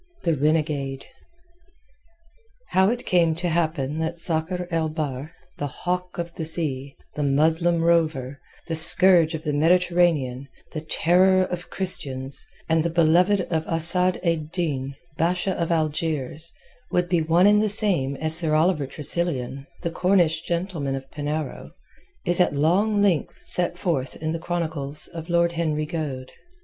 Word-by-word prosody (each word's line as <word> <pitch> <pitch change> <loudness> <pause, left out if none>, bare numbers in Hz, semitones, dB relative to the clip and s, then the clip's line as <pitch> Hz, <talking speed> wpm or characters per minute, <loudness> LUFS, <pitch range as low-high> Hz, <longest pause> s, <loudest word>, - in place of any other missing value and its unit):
THE 170 - +1
RENEGADE 145 -2 -1 1.6
How 190 +1 +3
it 245 +2 -3
came 170 -3 +2
to 175 +1 -2
happen 155 -3 -2
that 160 +1 -3
Sakr 170 +2 +3
el 165 -1 -1
Bahr, 150 -2 -5 0.3
the 145 - -2
Hawk 180 +5 -4
of 170 -1 -5
the 165 - -6
Sea, 140 -4 +1 0.2
the 150 - -5
Muslim 160 +4 +2
rover, 155 -6 0 0.3
the 165 - -4
scourge 170 0 +6
of 160 - -7
the 150 -2 -2
Mediterranean, 165 -5 +1 0.3
the 155 - -4
terror 185 +4 +2
of 180 -1 -6
Christians, 135 -7 +1 0.2
and 160 -1 +2
the 170 - -1
beloved 175 +4 +3
of 160 -1 0
Asad 175 +3 +2
ed 160 -3 -2
Din, 140 -7 -3 0.2
Basha 180 +3 0
of 170 -2 -3
Algiers, 155 -1 -2 0.4
would 180 0 0
be 175 -2 +1
one 165 +3 +2
and 210 0 +4
the 215 - 0
same 190 -10 0
as 155 +2 0
Sir 160 -2 +1
Oliver 155 -3 +1
Tressilian, 140 -2 -2 0.2
the 170 - -2
Cornish 175 -3 +1
gentleman 170 -6 -3
of 135 0 -9
Penarrow, 150 +1 -5 0.5
is 175 0 0
at 180 - +2
long 200 +8 +1
length 185 -6 0
set 175 -1 +1
forth 140 -9 -3
in 155 0 -4
the 165 - -4
chronicles 160 -4 0
of 165 0 -9
Lord 170 0 +2
Henry 155 -2 -2
Goade. 145 -5 -5
165 Hz, 150 wpm, -23 LUFS, 150-175 Hz, 1.6 s, scourge